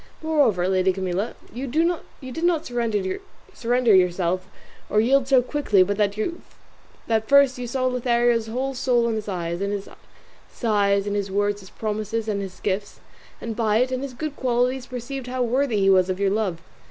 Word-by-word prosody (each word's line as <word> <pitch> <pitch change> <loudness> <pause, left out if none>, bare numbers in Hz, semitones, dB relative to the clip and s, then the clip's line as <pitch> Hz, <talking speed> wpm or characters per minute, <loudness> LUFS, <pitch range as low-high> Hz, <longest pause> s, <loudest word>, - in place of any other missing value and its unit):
Moreover, 275 - +2
lady 190 0 +2
Camilla, 190 +3 -2 0.2
you 260 +3 -4
did 320 -1 -2
not 335 -2 +2
surrender 235 - -1
yourself 180 0 +1 0.4
or 210 - +3
yield 260 +4 +3
so 265 -2 +5
quickly 245 -8 +3
but 200 +2 -2
that 220 0 -3
first 280 -2 +5
you 245 - -4
saw 255 +2 -1
Lothario's 240 -2 +2
whole 260 +4 -2
soul 245 -2 +1
in - - 0
his 215 -1 -4
eyes, 170 -2 -3
in 200 - -1
his 200 -1 -4 0.6
sighs, 200 -3 +1
in 205 - -2
his 200 -1 -1
words, 205 +1 0
his 190 -2 -13
promises 215 +1 -3
and 205 -2 -1
his 190 -2 -7
gifts, 200 0 -2 0.4
and 230 -1 -5
by 215 -2 +2
it 255 +2 +1
and 255 0 -2
his 275 -2 -6
good 305 +2 -4
qualities 250 0 0
perceived 255 +1 -6
how 255 0 -1
worthy 245 -2 +1
he 195 - +4
was 185 -1 +4
of 185 0 -2
your 200 -1 +2
love. 195 -6 -1
225 Hz, 175 wpm, -23 LUFS, 200-255 Hz, 0.6 s, so